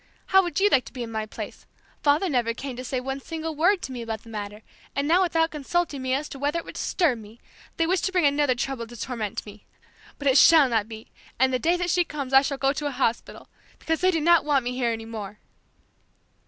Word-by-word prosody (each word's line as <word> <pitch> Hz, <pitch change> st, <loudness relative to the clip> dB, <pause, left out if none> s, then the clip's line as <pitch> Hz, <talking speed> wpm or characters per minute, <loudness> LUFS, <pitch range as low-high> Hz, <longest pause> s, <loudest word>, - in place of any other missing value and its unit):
How 385 Hz, -, +8 dB
would 350 Hz, -4 st, -2 dB
you 405 Hz, -, +5 dB
like 270 Hz, -11 st, +3 dB
to -, -, -12 dB
be 250 Hz, -3 st, -5 dB
in 230 Hz, -, -7 dB
my 220 Hz, -1 st, -3 dB
place? -, -, -8 dB, 0.3 s
Father 295 Hz, +6 st, +3 dB
never 240 Hz, -6 st, 0 dB
came 265 Hz, 0 st, -6 dB
to 255 Hz, -, -6 dB
say 255 Hz, 0 st, -2 dB
one 270 Hz, +2 st, -4 dB
single 320 Hz, +2 st, -5 dB
word 355 Hz, +5 st, +2 dB
to -, -, -5 dB
me 245 Hz, -2 st, -5 dB
about 225 Hz, -2 st, -5 dB
the 230 Hz, -, -14 dB
matter, 210 Hz, 0 st, -6 dB, 0.3 s
and 280 Hz, +1 st, 0 dB
now 345 Hz, +4 st, +4 dB
without 330 Hz, -2 st, +1 dB
consulting 300 Hz, 0 st, -2 dB
me 260 Hz, 0 st, 0 dB
as 295 Hz, +2 st, -3 dB
to 275 Hz, -, -9 dB
whether 290 Hz, +4 st, 0 dB
it 335 Hz, -, -4 dB
would -, -, -9 dB
disturb 300 Hz, -11 st, 0 dB
me, 220 Hz, +2 st, -14 dB, 0.4 s
they 330 Hz, -, +2 dB
wish 365 Hz, +2 st, +1 dB
to 380 Hz, -, -1 dB
bring 360 Hz, -4 st, +2 dB
another 285 Hz, -2 st, +2 dB
trouble 240 Hz, -1 st, -3 dB
to 240 Hz, +1 st, -11 dB
torment 220 Hz, -6 st, -4 dB
me 210 Hz, -, -8 dB, 0.2 s
more! -, -, -27 dB
But 285 Hz, -, -3 dB
it 270 Hz, +1 st, +6 dB
shall 315 Hz, -5 st, +7 dB
not 220 Hz, -2 st, 0 dB
be, 220 Hz, -1 st, -10 dB, 0.3 s
and 260 Hz, +1 st, +3 dB
the 255 Hz, -, +1 dB
day 340 Hz, +5 st, +2 dB
that 355 Hz, -1 st, -1 dB
she 355 Hz, +1 st, +3 dB
comes 280 Hz, -5 st, -6 dB
I 270 Hz, -, +8 dB
shall 275 Hz, 0 st, -2 dB
go 270 Hz, +1 st, +1 dB
to 295 Hz, +1 st, -3 dB
a -, -, -2 dB
hospital, 250 Hz, -3 st, -2 dB, 0.3 s
because 320 Hz, +1 st, -2 dB
they 370 Hz, -, +4 dB
do 330 Hz, -4 st, +1 dB
not 340 Hz, +1 st, +5 dB
want 285 Hz, -3 st, +2 dB
me 245 Hz, -, -1 dB
here 250 Hz, -1 st, 0 dB
any 225 Hz, -1 st, -5 dB
more!" 215 Hz, -2 st, -7 dB
275 Hz, 255 wpm, -25 LUFS, 240-325 Hz, 0.4 s, How